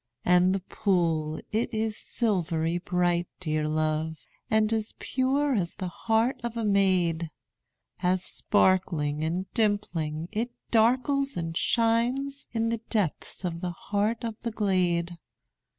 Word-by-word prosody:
And 180 +1 +4
the 195 - -2
pool, 165 -5 0
it 220 +3 0
is 220 -1 -1
silvery 175 -8 0
bright, 175 -1 +1
dear 155 -3 -1
love, 155 +1 0 0.3
And 220 0 +3
as 220 -1 -2
pure 275 +2 +1
as 180 -7 -1
the 185 - -4
heart 225 +7 0
of 235 -1 -4
a 225 - -1
maid, 185 -5 +2 0.7
As 180 +1 +1
sparkling 170 -9 +1
and 175 +4 -1
dimpling, 170 -8 0
it 225 +3 -1 0.2
darkles 260 +5 +2
and 165 -1 -3
shines 245 +7 +1
In 225 -1 0
the 230 -1 -2
depths 195 -3 -1
of 170 -1 -3
the 180 -1 -2 0.2
heart 215 +3 +1
of 230 -1 -2
the 235 - -2
glade. 180 -5 0
190 Hz, 135 wpm, -27 LUFS, 170-225 Hz, 0.7 s, And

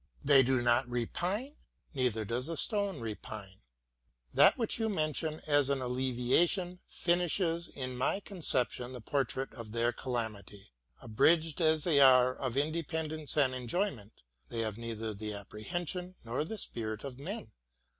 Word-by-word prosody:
They 140 -1 +8
do 130 -1 +2
not 120 0 +3
repine? 180 - -2 0.4
Neither 125 -6 0
does 125 +7 -2
a 165 - -3
stone 200 - +1
repine. 105 -3 -7 0.7
That - - +6
which 230 -1 -1
you 225 -1 +1
mention 155 -3 -1
as 145 -2 +3
an 140 -1 +1
alleviation 130 +9 +1
finishes 170 -1 0
in 130 -2 -5
my 130 +10 0
conception 130 - 0
the 125 - -7
portrait 135 +1 -1
of 115 -3 -9
their 120 +1 +2
calamity. 110 - -5 0.3
Abridged 160 +9 +3
as 155 -1 +3
they 155 -5 +4
are 130 -2 +7
of 130 -2 -3
independence 155 0 -2
and 135 -3 +4
enjoyment, 125 - -3 0.3
they 115 -1 -2
have 110 -2 -2
neither 115 -1 -4
the 105 +1 -5
apprehension 175 - -4
nor 120 +5 -1
the 220 +7 -5
spirit 110 - -4
of 135 -2 -7
men. 170 - -6
130 Hz, 145 wpm, -32 LUFS, 115-165 Hz, 0.7 s, They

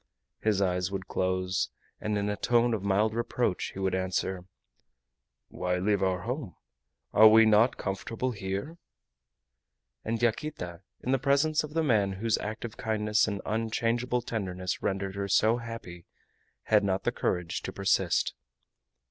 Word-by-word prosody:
His 105 -2 +2
eyes 90 -1 0
would 95 -1 -4
close, 95 0 0 0.3
and 105 -1 -1
in 100 0 -1
a 105 - 0
tone 120 +2 +2
of 110 - -1
mild 100 +2 +2
reproach 115 -3 -1
he - - -11
would 95 -1 0
answer: 95 0 -1 1.0
"Why 90 0 -1
leave 100 +1 +1
our 95 -1 +1
home? 120 - -4 0.6
Are 110 +1 +9
we 110 +1 +7
not 110 +3 +4
comfortable 115 +6 -3
here?" 100 - -4 1.2
And 115 +1 -2
Yaquita, 115 - -2 0.2
in 130 - -2
the 135 - +3
presence 145 +4 +2
of 150 +1 -8
the 165 - +2
man 105 -8 +2
whose 110 +3 0
active 110 +1 -5
kindness 105 0 +1
and 100 -2 -3
unchangeable 115 +2 0
tenderness 95 -6 -3
rendered 95 0 -2
her 100 0 -3
so 110 +4 +3
happy, 115 -8 -8 0.6
had 105 -1 +3
not 95 -1 0
the - - +1
courage 90 0 -2
to - - -5
persist. 100 -1 +1
105 Hz, 150 wpm, -29 LUFS, 95-115 Hz, 1.2 s, Are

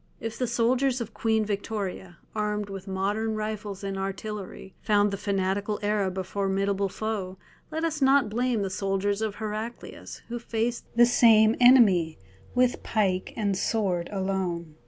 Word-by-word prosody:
If 225 0 -5
the 250 - 0
soldiers 245 +3 +1
of 230 -2 -5
Queen 220 -1 +1
Victoria, 200 -3 -4 0.2
armed 210 -1 -2
with 195 0 -7
modern 205 +4 -1
rifles 215 -2 -4
and 195 -1 -3
artillery, 195 0 -6
found 205 -1 +3
the - - -1
fanatical 200 +1 -1
Arab 205 -3 0
a 190 - -1
formidable 195 +1 -1
foe, 195 -3 -4 0.3
let 320 +1 -3
us 310 -2 -1
not 270 -2 +5
blame 235 0 0
the 195 - -3
soldiers 200 +1 -1
of 215 -2 -2
Heraclius 215 +2 -6
who 240 0 -4
faced 230 +1 -2
the 240 0 +7
same 225 -2 +5
enemy 210 -11 +6 0.4
with 250 0 +2
pike 190 -4 0
and 205 -3 0
sword 185 -4 0
alone. 190 -4 -2
210 Hz, 150 wpm, -27 LUFS, 195-225 Hz, 0.4 s, the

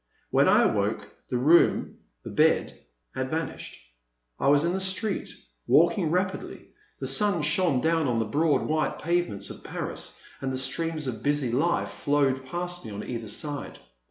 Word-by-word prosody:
When - - +4
I - - +5
awoke, - - -1 0.2
the 125 - 0
room, 155 +8 +3 0.2
the - - -7
bed - - +1 0.3
had 130 0 -3
vanished; 160 +2 -4 0.6
I 135 - +1
was 145 +1 +5
in 170 +1 +1
the 190 - -1
street, 190 +2 -1 0.4
walking 170 +1 +4
rapidly; 185 +3 -2 0.3
the - - -4
sun 205 -7 +3
shone 155 -3 +2
down 160 -1 +1
on 120 -2 0
the 115 - +1
broad 150 +7 +1
white 155 0 -1
pavements 170 - -1
of - - -11
Paris, - - -5 0.2
and 135 -1 -2
the 130 - -2
streams 155 +4 -1
of 115 -5 -4
busy 145 -3 0
life 155 +8 +1
flowed 135 -3 0
past 175 +3 -3
me - - -7
on 105 0 -6
either 115 -3 -5
side. 145 +7 -5
150 Hz, 165 wpm, -26 LUFS, 130-170 Hz, 0.6 s, I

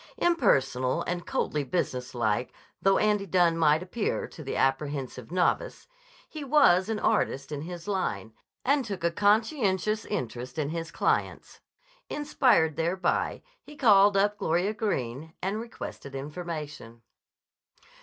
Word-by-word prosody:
Impersonal 140 - +2
and 175 0 -4
coldly 150 -1 -1
business 130 -5 -3
like 120 +1 0 0.3
though 195 0 +4
Andy 210 -2 +1
Dunne 175 -1 +3
might 160 0 +3
appear 205 +4 -2
to 155 - -10
the 135 - -4
apprehensive 135 -2 -1
novice, 185 - 0 0.4
he 310 -2 -7
was 250 -10 +4
an 220 - 0
artist 145 -11 0
in 145 -1 -4
his 175 +3 -8
line, 110 - -2 0.3
and 280 +1 +3
took 200 -7 -6
a 170 - +2
conscientious 210 - +1
interest 125 - -4
in 145 -2 -1
his 165 +1 -4
clients. - - -1 0.5
Inspired 255 - +2
thereby, 170 +3 0 0.2
he 295 - -13
called 205 -6 +5
up 205 +1 +2
Gloria 180 +2 +1
Greene 160 - -3
and 195 +4 -2
requested 220 - -8
information. 150 -5 -7
175 Hz, 130 wpm, -28 LUFS, 140-210 Hz, 0.5 s, called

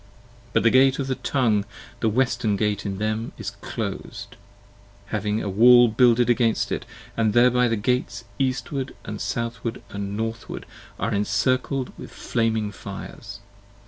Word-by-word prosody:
But - - +3
the 115 - +5
gate 130 +1 +5
of 140 - -2
the 130 - -1
tongue, 120 -6 +1 0.4
the 115 - +2
western 120 -2 +1
gate 105 0 -1
in 95 -1 -3
them 110 +2 -2
is - - -5
clos'd, - - -5 0.8
Having 105 +1 -1
a - - -3
wall 120 +4 +7
builded 120 +1 +4
against 120 -2 +2
it: - - -2 0.3
and 110 -2 +1
thereby 125 +1 +5
the 115 - +1
gates 125 +4 -1 0.2
Eastward 130 +1 -2 0.2
& 105 - -4
Southward 115 +2 -3
& - - -15
Northward, 105 +3 -4 0.3
are 115 - -1
incircled 130 +6 0
with - - -8
flaming 110 -2 -1
fires. 100 - -9
115 Hz, 145 wpm, -24 LUFS, 105-125 Hz, 0.8 s, wall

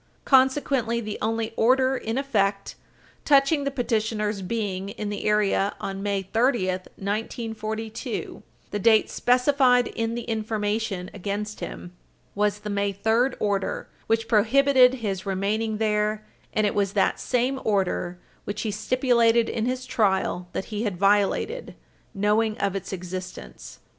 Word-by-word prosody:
Consequently, 265 -3 +3
the 215 -2 -5
only 225 +1 -1
order 260 +3 +3
in 225 -1 -3
effect 200 -8 0 0.5
touching 280 0 +4
the - - +1
petitioner's 220 -5 -1
being 195 -1 -3
in 205 +1 -5
the 205 - -4
area 210 -1 +2
on 195 0 -4
May 200 -1 -1
30, 225 0 +1 0.3
1942, 220 +1 -4 0.3
the 205 - -2
date 220 +2 +4
specified 250 0 +3
in 230 0 -2
the 240 - -4
information 215 -4 -2
against 205 +2 -4
him, 180 0 -7 0.4
was 210 0 0
the 210 - -5
May 200 0 0
3 225 +6 +1
order 200 -2 -1 0.2
which 225 0 +1
prohibited 255 +4 +5
his 200 -5 -4
remaining 210 +3 -1
there, 215 0 0 0.3
and 215 - +1
it 205 - +1
was 200 -1 0
that 200 -2 +1
same 250 +2 0
order 185 -3 0 0.3
which 205 +1 -4
he 220 - -1
stipulated 235 +1 +2
in 225 0 -1
his 255 0 -2
trial 190 -7 0
that - - -3
he 210 - -2
had 205 -6 -2
violated, 205 - +1 0.4
knowing 215 +2 +1
of 200 -1 -1
its 195 - -5
existence. 185 0 -7
215 Hz, 140 wpm, -25 LUFS, 200-235 Hz, 0.5 s, prohibited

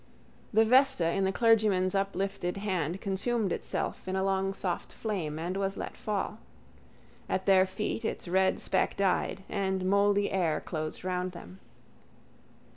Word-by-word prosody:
The 220 +1 +5
vesta 255 -8 +4
in 195 +1 +1
the 190 - +1
clergyman's 210 -5 +3
uplifted 195 -2 -1
hand 185 -3 -2
consumed 200 +2 0
itself - - -3
in 185 - -1
a 190 - +1
long 195 0 +1
soft 180 -3 -3
flame 180 -9 -3
and 175 +3 -3
was 195 0 -1
let - - -5
fall. 210 +1 -3 0.9
At 190 - -1
their 190 -1 +5
feet 210 +4 -3
its 220 - -3
red 190 +2 +2
speck 190 - 0
died: 195 0 0
and 190 -1 -1
mouldy 200 +1 +3
air 170 -5 +1
closed 155 -1 -5
round 180 0 -2
them. 180 +2 -11
190 Hz, 145 wpm, -29 LUFS, 185-200 Hz, 0.9 s, The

